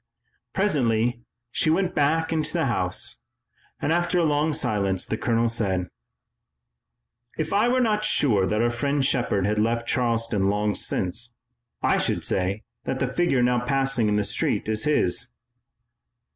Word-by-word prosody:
Presently 120 - +1 0.3
she 155 - +1
went 180 +3 +1
back 160 +3 +1
into 155 -1 0
the - - +1
house. - - -2 0.6
After 175 +2 +1
a 175 - +3
long 150 0 +1
silence 100 - 0
the - - -2
colonel 115 +1 +1
said: 95 -6 -1 1.5
"If 155 -1 -2
I 210 +4 +3
were 255 +1 +2
not 215 -3 +1
sure 105 - +2
that 105 +2 +1
our 120 - +2
friend 140 +3 0
Shepard 120 -7 +1
had 105 +1 0
left 115 +2 0
Charleston 115 -5 +1
long 105 +1 0
since, 115 +8 -2 0.5
I - - +3
should - - -1
say 95 +3 -1 0.2
that 130 - -2
the 130 -1 -2
figure 155 -7 +2
now 125 0 +2
passing 135 -4 +1
in 105 - +1
the 105 - +1
street - - 0
is 110 0 -1
his." 125 -4 +1
120 Hz, 150 wpm, -24 LUFS, 105-150 Hz, 1.5 s, a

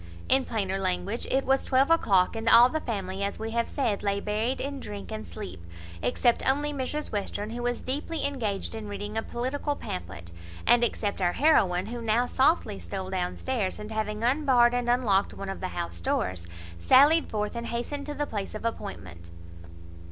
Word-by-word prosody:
In 265 0 +3
plainer 195 -3 -1
language, 185 +4 -2
it 270 +1 +1
was 270 +1 +2
twelve 270 +3 +3
o'clock, 195 - +3
and 225 0 0
all 240 +2 +8
the 315 - -1
family, 195 -4 -4
as 200 - -2
we 220 +1 -4
have 235 0 0
said, 225 -8 -1
lay 200 -1 0
buried 215 +5 -1
in 280 0 -4
drink 205 -4 -7
and 215 0 -5
sleep, 200 - -8 0.4
except 230 - +2
only 290 +2 +1
Mrs 290 +2 -3
Western, 205 +1 -2
who 240 +1 -5
was 245 0 -2
deeply 295 +5 -2
engaged 225 -10 -2
in 220 -2 -6
reading 205 +1 -5
a 225 - +1
political 265 +6 -3
pamphlet, 85 - -7 0.3
and 240 0 +5
except 205 -4 -1
our 175 -1 +2
heroine, 195 - +3
who 235 +2 -6
now 230 +2 +2
softly 260 - +2
stole 190 -1 -5
down 180 -1 -2
stairs, 235 -8 -1
and, 210 +1 -7
having 215 0 -2
unbarred 250 -2 +4
and 245 -1 0
unlocked 220 -6 +2
one 195 0 -6
of 195 - -5
the 185 - -3
house 85 - -5
doors, 90 0 -1 0.3
sallied 290 - +5
forth, 210 +1 -2
and 235 0 -4
hastened 280 +5 -4
to 295 - -4
the 295 - -1
place 205 -5 -5
of 215 - -6
appointment. 90 - -6
220 Hz, 190 wpm, -27 LUFS, 195-260 Hz, 0.4 s, all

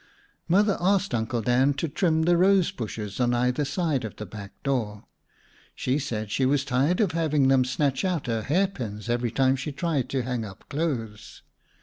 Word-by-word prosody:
Mother 200 +4 +3
asked 195 -2 +2
Uncle 115 0 -1
Dan 130 +4 +3
to 155 +4 -2
trim 160 +1 +1
the 175 +1 +4
rose 190 0 +4
bushes 105 -2 -6
on 120 -1 +2
either 125 +4 +1
side 145 -2 -1
of 110 - -6
the 105 - -7
back 100 -2 -9
door. 110 -7 -2 0.7
She 130 +3 0
said 110 -7 -4
she 135 - 0
was 140 +1 +2
tired 140 +6 +1
of 205 -6 +2
having 155 -4 +2
them 135 -1 +5
snatch 135 +3 0
out 180 -5 -1
her 115 -3 -1
hairpins 125 - -2
every 120 0 0
time 130 +3 +2
she 135 +3 -4
tried 145 -3 -1
to 130 -2 -1
hang 125 -2 -2
up 100 -3 -11
clothes. 125 -9 -4
135 Hz, 185 wpm, -26 LUFS, 120-160 Hz, 0.7 s, them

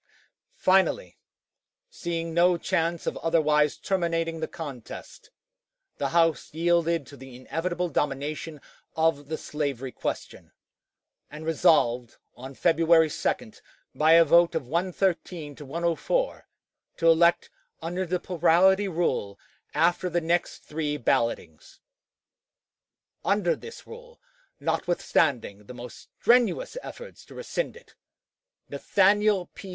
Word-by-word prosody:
Finally, 190 - +2 0.7
seeing 170 - -4
no 175 +1 +4
chance 165 0 -1
of - - -2
otherwise 150 -3 +2
terminating 165 -3 -1
the 160 - -2
contest, 145 -9 -9 0.7
the - - -1
House 165 -2 +1
yielded 170 -2 +1
to 140 - -13
the 135 -2 -12
inevitable 175 +7 -3
domination 150 +1 -3 0.4
of 160 -3 +1
the 155 +1 -3
slavery 140 -5 -4
question, - - -6 0.8
and 150 +2 -9
resolved, 125 -7 +2 0.2
on 130 +2 -10
February 165 -1 +4
2, - - -2 0.4
by 155 +1 +4
a 165 0 +7
vote 170 +2 +4
of 160 -5 -2
113 170 -1 -2
to 145 - -11
104, 170 - -1 0.5
to 165 - +1
elect 170 +1 +4 0.3
under 175 +3 -3
the 180 0 -2
plurality 185 +4 +3
rule 160 - -1 0.4
after 175 +3 +2
the 175 0 0
next 170 +1 -1
three 150 -1 -3
ballotings. 115 - -2 1.4
Under 200 -4 +1
this 460 - -11
rule, 485 +1 -13 0.4
notwithstanding 125 - 0
the 125 - -9
most 120 0 -11
strenuous 250 - +3
efforts - - -10
to - - -14
rescind - - -4
it, 485 - -19 0.7
Nathaniel 200 -1 +2
P. 195 - -10
165 Hz, 115 wpm, -26 LUFS, 150-180 Hz, 1.4 s, a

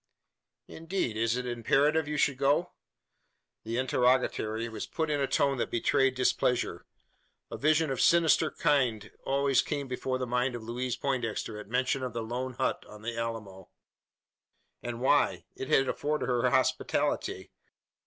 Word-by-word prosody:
"Indeed! 165 - -3
Is 115 +2 +1
it 125 - -3
imperative 140 +6 +2
you 150 0 -2
should 140 -2 +1
go?" 145 +6 +2 0.9
The 115 +1 -3
interrogatory 125 -3 +1
was 110 -1 -6
put 160 -2 -2
in 145 - 0
a 135 - +1
tone 135 -1 +1
that - - -1
betrayed 135 +3 +2
displeasure. 125 -1 0 0.6
A - - -5
vision 155 0 +2
of 130 - -2
a - - +2
sinister 165 -2 +4
kind 125 -9 0
always 135 -1 +2
came 145 -2 -3
before 130 0 -2
the 130 - -2
mind 125 +1 0
of 120 - -7
Louise 120 +2 -3
Poindexter 115 -5 -2
at 105 - -9
mention 130 +2 0
of 125 -3 -4
the 115 -1 -3
lone 125 +3 -4
hut - - -1
on 105 0 -12
the 115 +1 -3
Alamo. 110 -5 -5 1.1
And 120 0 -5
why? 140 +3 +2
It 130 - -6
had 135 - +4
afforded 150 +3 -1
her 125 -1 +1
hospitality. - - 0
130 Hz, 155 wpm, -29 LUFS, 115-140 Hz, 1.1 s, sinister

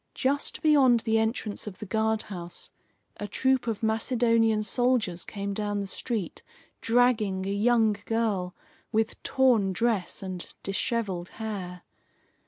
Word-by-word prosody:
Just 280 +2 0
beyond 270 -6 +5
the 225 -1 +2
entrance 220 -2 -2
of 195 - -7
the - - -7
guardhouse 210 -4 -2 0.5
a 205 - -5
troop 260 +4 +1
of 225 -1 -2
Macedonian 225 -1 +2
soldiers 230 -6 +1
came 200 -1 -4
down 205 0 -2
the 200 - -2
street, 210 0 -3 0.4
dragging 225 -5 +2
a 195 - -2
young 220 0 +3
girl 210 -6 0 0.4
with 220 0 0
torn 240 -8 +3
dress 210 -2 -1
and 185 -2 -6
dishevelled 195 -3 -1
hair. 195 -5 -5
220 Hz, 125 wpm, -27 LUFS, 195-235 Hz, 0.5 s, beyond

